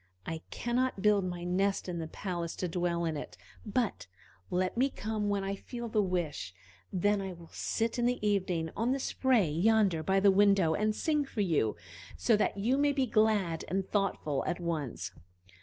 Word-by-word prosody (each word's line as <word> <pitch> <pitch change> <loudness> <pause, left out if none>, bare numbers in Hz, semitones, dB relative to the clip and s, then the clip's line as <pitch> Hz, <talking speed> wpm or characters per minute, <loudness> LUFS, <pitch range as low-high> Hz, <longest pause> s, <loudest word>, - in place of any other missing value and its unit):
I 165 -1 -4
cannot 240 -3 -1
build 205 -2 +4
my 175 -1 -4
nest 195 +3 0
in 175 -2 -3
the 160 - -4
palace 170 -1 -4
to 180 - -2
dwell 170 0 -1
in 160 -1 -1
it, 145 - -7 0.3
but 215 - -1 0.4
let 185 +1 0
me 260 +4 +3
come 215 -3 -2
when 200 -1 0
I 195 0 -2
feel 235 +4 -6
the 215 -1 +2
wish; 170 - -2 0.4
then 200 +2 +2
I 190 -1 -4
will 170 -1 -14
sit 230 +1 -1
in 240 - +3
the 245 -4 0
evening 180 -5 0
on 235 +5 +1
the 275 - -1
spray 255 -7 +2
yonder 185 +2 +3
by 190 +4 +2
the 200 0 +6
window, 195 -4 +4
and 215 +4 +1
sing 300 -2 +1
for 230 -5 -3
you, 155 - +1 0.4
so 230 - +3
that 210 -1 0
you 240 +7 +1
may 290 0 +3
be 270 -2 +1
glad 215 -7 +2
and 190 +2 -1
thoughtful 175 -9 0
at 175 - -1
once. 145 - -3
195 Hz, 190 wpm, -31 LUFS, 170-220 Hz, 0.4 s, the